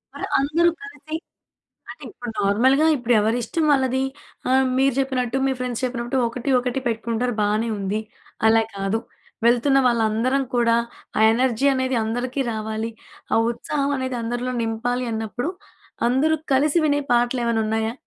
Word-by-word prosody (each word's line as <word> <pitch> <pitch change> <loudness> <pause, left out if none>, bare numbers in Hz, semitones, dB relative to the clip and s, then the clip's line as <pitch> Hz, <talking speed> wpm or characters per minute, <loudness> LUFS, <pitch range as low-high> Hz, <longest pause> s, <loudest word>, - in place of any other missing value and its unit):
మరి - - -4
అందరూ 310 +5 +3
కలిసి 310 -7 -8 0.8
అంటే, - - -10
ఇప్పుడు 245 -7 -7
నార్మల్‍గా 255 +10 +3
ఇప్పుడు 245 -2 +1
ఎవరిష్టం 235 +9 0
వాళ్ళది. 260 -1 +2 0.5
ఆహ్, 265 0 +4
మీరు 270 -1 +3
చెప్పినట్టు, 260 -2 -1
మీ 270 - +2
ఫ్రెండ్స్ 250 -1 -3
చెప్పినట్టు, 245 0 -2
ఒకటి, 250 +3 -4
ఒకటి 250 +1 -2
పెట్టుకుంటారు 230 +1 -1
బానే 215 +3 +1
ఉంది. 200 +2 -2 0.5
అలా 225 0 +5
కాదు, 195 +3 -1 0.5
వెళ్తున్న 250 +3 +4
వాళ్ళందరం 235 +3 +1
కూడా, 230 -1 +3 0.4
ఆ - - +2
ఎనర్జీ 255 +2 +1
అనేది 260 -1 0
అందరికీ 245 +4 -2
రావాలి, 220 +1 -3 0.4
ఆ - - +4 0.2
ఉత్సాహం 280 +4 -2
అనేది 260 -1 -3
అందరిలో 245 +2 -2
నింపాలి 245 +3 -2
అన్నప్పుడు, 225 +7 -3 0.6
అందరూ 285 +6 +2 0.2
కలిసి 295 +5 +3
వినే 290 0 +2
పాటలేమన్నున్నయా? 230 -2 +1
245 Hz, 135 wpm, -22 LUFS, 225-265 Hz, 0.8 s, అలా